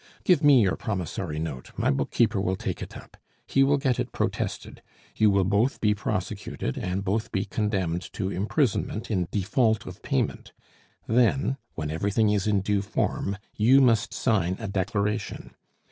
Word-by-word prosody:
Give 175 -4 +3
me 140 -5 +7
your 95 - +1
promissory 90 -5 -3
note; 80 -5 -5
my - - +2
bookkeeper 105 - +1
will 95 -1 0
take - - -4
it - - -7
up; - - -14 0.3
he 135 - +2
will 140 +1 +4
get 130 -3 0
it - - -2
protested; - - -3 0.3
you 110 - +4
will 100 -1 +3
both 105 +7 +1
be 105 -1 +3
prosecuted 100 -8 -3
and 90 +2 -2
both 110 +3 -1
be 95 - -1
condemned 95 -5 -2
to 95 -3 -2
imprisonment 110 - -1
in 90 -5 0
default 110 +2 +1
of - - -9
payment; 65 - -2 0.5
then, 125 +4 +2 0.2
when 75 -2 -3
everything 100 +6 +1
is 105 -1 0
in 100 -2 +2
due 100 0 +1
form, 100 0 -2 0.2
you 125 +6 +5
must 115 -4 +3
sign 95 -6 +1
a - - -4
declaration. 100 +2 -2
105 Hz, 160 wpm, -26 LUFS, 95-115 Hz, 0.5 s, me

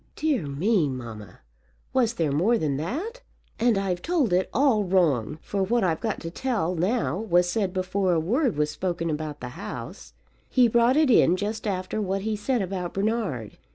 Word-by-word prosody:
"Dear 285 - 0
me, 165 +3 +1
mamma; 115 -6 -8 0.5
was 245 -3 +2
there 160 -7 0
more 190 +12 +3
than 145 -8 -1
that?" 340 - -4 0.4
"And 230 -2 +3
I've 190 -3 -1
told 315 - +1
it 185 +1 +2
all 250 -5 +3
wrong; 155 - +1
for 200 - -2
what 230 +5 +1
I've 165 -3 +1
got 220 -3 -2
to 165 - -5
tell 210 -5 -1
now 180 - 0
was 180 -5 +2
said 195 +1 0
before 185 0 0
a 165 - +2
word 235 - 0
was 150 0 +1
spoken 170 0 -2
about 150 -1 -4
the 125 - -5
house. 165 +10 -8 0.4
He 250 -2 +5
brought 235 +3 +3
it 305 -4 +4
in 180 -5 +5
just 215 +3 -3
after 190 +2 -2
what 195 -1 -2
he 220 0 -1
said 225 +1 0
about 180 -2 -4
Bernard. 195 - -2
190 Hz, 185 wpm, -25 LUFS, 165-230 Hz, 0.5 s, He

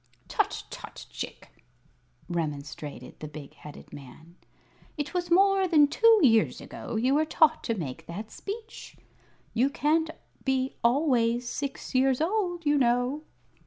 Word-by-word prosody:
"Tut - - -1
tut, - - -9
Chick!" - - -8 0.6
remonstrated 150 -3 -5
the 155 - -6
big 150 -2 -10
headed 150 -1 -12
man; 155 +5 -12 0.6
"it 295 +2 -3
was 350 -1 -1
more 390 +2 +4
than 305 -4 +6
two 450 +8 +5
years 225 -5 +4
ago - - -7
you 250 +5 +2
were 300 +2 +4
taught 315 0 +3
to 230 - 0
make 160 -1 -6
that 210 +6 -7
speech. 445 +2 -8 0.6
You 250 +4 +3
can't 315 +2 +1 0.3
be 265 -1 0
always 240 -2 +2
six 275 +2 -5
years 260 0 +3
old, 350 -1 -1
you 290 0 +3
know." 245 +4 +1
265 Hz, 135 wpm, -28 LUFS, 215-320 Hz, 0.6 s, than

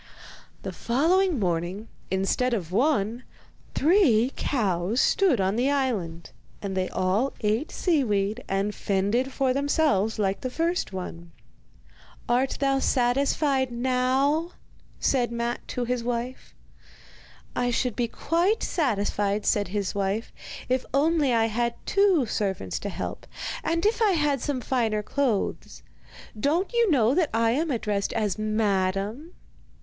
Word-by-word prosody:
The - - -4
following 335 +8 +2
morning, 180 +2 -2 0.2
instead 195 +6 +1
of 175 -6 -5
one, 235 0 +1 0.5
three 275 - +4
cows 205 -3 0
stood 360 - +3
on 190 +1 +1
the 255 +3 +2
island, 215 -13 -2 0.3
and 195 -2 -4
they 185 -1 0
all 190 +8 0
ate 220 +7 0
seaweed 220 - 0
and 195 +2 0
fended 205 +8 0
for 265 -1 +1
themselves 275 - +1
like 195 -2 0
the 255 - -2
first 335 - -1
one. 170 -3 -7 1.0
'Art 255 +2 +1
thou 275 -1 +2
satisfied 265 +1 +1
now?' 260 +6 +1 0.5
said 245 -3 +1
Matte 235 0 -3
to 245 - -3
his 245 0 -1
wife. 245 +1 -4 1.0
'I 245 0 +1
should 245 -1 0
be 240 -1 0
quite 350 - 0
satisfied,' 205 - 0
said 205 -1 +2
his 200 0 -2
wife, 200 +3 -2 0.3
'if 255 0 +1
only 300 -1 +3
I 225 -1 +3
had 235 +1 -1
two 390 -8 +3
servants 195 - -2
to 205 - -4
help, - - -6 0.4
and 335 +3 0
if 445 +2 +2
I 420 -3 +4
had 295 -5 +1
some 275 -2 -2
finer 225 -5 0
clothes. 250 -3 -2 0.6
Don't 330 - 0
you 470 -2 +3
know 250 -6 +3
that 325 -1 +2
I 225 0 +3
am 310 +7 0
addressed 210 -6 -1
as 215 -2 -1
Madam? 215 - -1
240 Hz, 135 wpm, -26 LUFS, 205-280 Hz, 1.0 s, three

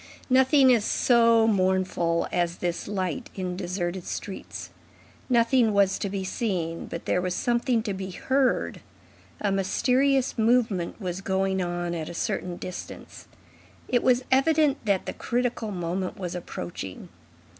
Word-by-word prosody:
Nothing 265 +1 +6
is 235 -4 +3
so 230 -1 +4
mournful 185 -4 +1
as 175 0 0
this 175 -1 -3
light 200 +5 -3
in 185 -2 -3
deserted 180 0 -3
streets. 195 +2 -6 0.6
Nothing 235 -2 +3
was 200 -1 +3
to 200 - -2
be 195 0 -3
seen, 180 -5 -2
but 170 - -6
there 180 - +1
was 180 0 -2
something 240 -1 +1
to 210 -3 -2
be 190 0 -5
heard. 260 +8 0 0.6
A 205 - +1
mysterious 255 +7 +1
movement 220 -6 +1
was 185 -2 -4
going 190 0 0
on 175 -1 -2
at 160 -2 -4
a 175 - -8
certain 175 +1 -2
distance. 185 - -8 0.6
It 245 - +2
was 255 0 +3
evident 290 +1 +3
that 200 -3 +1
the - - -4
critical 240 -2 -2
moment 180 0 -3
was 180 -3 -4
approaching. 170 - -7
195 Hz, 140 wpm, -26 LUFS, 180-240 Hz, 0.6 s, Nothing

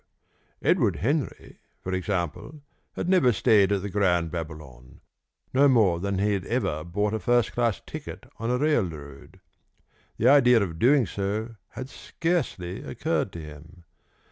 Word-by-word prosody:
Edward - - +3
Henry, 145 - -3 0.2
for 95 - -3
example, 95 - -3 0.3
had - - -4
never 180 -9 +4
stayed 105 -2 +3
at 100 -2 0
the 100 - -3
Grand 90 -5 +1
Babylon, 75 -7 -8 0.5
no 140 +2 +5
more 105 -10 +3
than 100 +1 -2
he 105 +2 +1
had 95 -2 -2
ever 75 +1 -1
bought 105 +5 -1
a 110 - -1
first 120 -2 +2
class 120 -3 0
ticket - - -8
on 115 +1 -3
a 125 - +1
railroad. 85 - -2 0.8
The 115 - +2
idea 125 -3 +6
of 80 -4 -5
doing 130 +1 +4
so 105 +4 -3 0.2
had 130 - -6
scarcely 135 - -3
occurred - - -2
to 85 - -7
him. 80 +4 -13
100 Hz, 145 wpm, -26 LUFS, 85-120 Hz, 0.8 s, idea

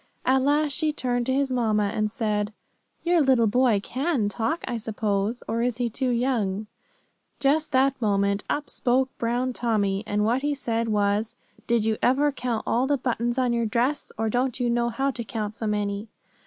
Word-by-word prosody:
At 260 +1 +4
last 290 +2 +2
she 310 +2 +1
turned 245 -4 -1
to 260 - +1
his 275 -1 +1
mamma, 215 -5 +1
and 215 -1 0
said: 210 -2 -1 0.5
"Your 345 -1 +3
little 260 -5 +4
boy 235 -1 +3
can 260 - 0
talk, 230 +10 -2
I 240 - -2
suppose, 215 0 -2
or 230 +1 -1
is 240 -1 0
he 240 -2 -1
too 260 +3 -1
young?" 230 -5 0 0.7
Just 300 +3 +2
that 265 0 +2
moment, 200 -1 +1
up 295 0 -1
spoke 260 +1 +1
Brown 245 +2 0
Tommy, 205 -5 0
and 210 0 +1
what 240 +4 +1
he 290 0 0
said 230 -4 -1
was: 210 0 0 0.3
"Did 235 -2 +2
you 220 -1 +1
ever 285 +4 +3
count 245 -4 -3
all 250 +3 +1
the 285 0 +2
buttons 240 -1 -1
on 250 -2 +2
your 235 -1 +1
dress, 250 +7 0
or 225 +1 0
don't 250 +3 0
you 240 -1 +1
know 235 0 +1
how 270 +4 0
to 240 -2 -4
count 215 -2 -4
so 220 0 -4
many?" 210 0 -2
235 Hz, 190 wpm, -25 LUFS, 215-260 Hz, 0.7 s, At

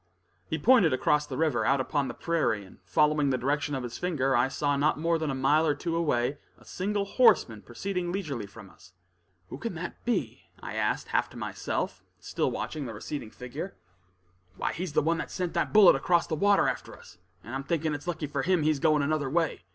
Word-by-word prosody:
He 160 - -2
pointed 195 - +5
across 150 +3 +2
the - - -5
river, 150 -8 +1
out 135 +4 +2
upon 140 +1 0
the - - -6
prairie; 155 - 0
and 95 - -17
following 150 +9 +2
the 130 - +1
direction 145 +3 -1
of 130 - -3
his 120 -1 -6
finger, 135 -7 0
I 120 +2 +3
saw 145 +1 0
not 145 +1 +1
more 165 +1 +1
than 155 -2 -2
a 135 - -1
mile 150 +5 +3
or 145 - +2
two 165 -2 -3
away 145 -4 0 0.2
a - - -20
single 200 +2 -2
horseman 160 - +3
proceeding 180 - -4
leisurely 150 - -4
from 100 -1 -13
us. 90 - -19 0.6
"Who - - -7
can 230 -6 -4
that 170 +2 -7
be?" 240 - -2
I - - -7
asked - - -1
half - - +1
to - - -12
myself, - - -3 0.2
still - - -1
watching 150 -4 -4
the 115 - -7
receding 115 +2 -6
figure. 135 - -7 0.8
"Why - - -1
he's 175 -2 -4
the - - +2
one 165 +2 +1
that - - -4
sent 180 -2 -3
that - - 0
bullet 210 -7 +8
across 170 +5 +2
the - - -5
water 200 +5 +3
after - - -4
us, 90 0 -16 0.2
and 120 - -9
I'm 135 +1 -3
thinking 160 +1 -1
it's 145 +3 -6
lucky 165 -3 -2
for 140 -1 -2
him, 180 +1 +2
he's 155 -2 +2
going 155 -2 +3
another 145 -2 0
way. 160 - -1
150 Hz, 215 wpm, -28 LUFS, 135-170 Hz, 0.8 s, bullet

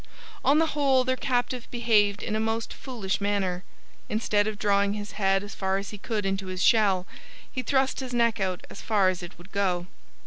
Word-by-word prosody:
On 285 - +5
the 325 - +4
whole 275 -3 +3
their 260 0 +1
captive 250 -1 -1
behaved 210 -4 +2
in 215 - -2
a - - 0
most 225 +1 -1
foolish 215 -8 -3
manner. 195 -3 0 0.5
Instead 210 -1 +1
of 215 -1 -3
drawing 200 -1 +2
his 205 0 -5
head 195 -1 +1
as 205 0 -8
far 190 0 0
as 200 +1 -5
he 210 - -8
could 210 -1 -2
into 195 0 -1
his 185 0 -2
shell, 205 -7 +4 0.5
he 255 - -2
thrust 265 +1 +1
his 260 -2 -5
neck 235 -2 +2
out 185 -2 -2
as - - -10
far 205 -4 +3
as 185 -1 -3
it 175 - -9
would 175 +3 -15
go. 185 -3 0
205 Hz, 205 wpm, -27 LUFS, 195-240 Hz, 0.5 s, On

